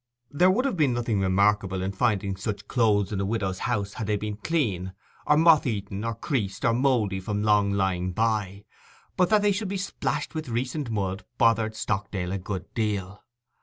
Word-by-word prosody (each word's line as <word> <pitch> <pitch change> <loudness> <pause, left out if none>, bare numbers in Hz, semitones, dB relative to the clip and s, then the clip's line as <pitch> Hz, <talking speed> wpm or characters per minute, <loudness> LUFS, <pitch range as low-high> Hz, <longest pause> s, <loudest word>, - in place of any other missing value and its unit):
There 180 +6 +4
would 235 +8 +2
have 275 - 0
been 145 -7 +2
nothing 115 -4 0
remarkable 95 0 +2
in 95 - -1
finding 100 -2 0
such 105 +2 -5
clothes 110 -5 +2
in 100 - -2
a - - 0
widow's 95 -3 -2
house 100 -4 -1
had 110 - -5
they 105 -1 +1
been 105 0 -4
clean; 100 - -1 0.3
or 150 - +5
moth 160 -3 +5
eaten, 100 -2 -3
or 115 -1 -2
creased, 105 -5 -2
or 115 - +4
mouldy 115 -6 +1
from 105 +2 -2
long 105 -2 +3
lying 95 -2 0
by; 105 -1 -1 0.5
but 180 -1 +3
that 215 -1 +4
they 205 - +4
should 200 +1 -2
be 195 +1 -2
splashed 195 -3 -3
with 155 -4 -5
recent 125 +3 -2
mud 100 -2 -2
bothered 110 -1 +2
Stockdale 100 -4 -2
a 100 - -2
good 95 0 -6
deal. 105 -3 -2
105 Hz, 190 wpm, -26 LUFS, 100-125 Hz, 0.5 s, or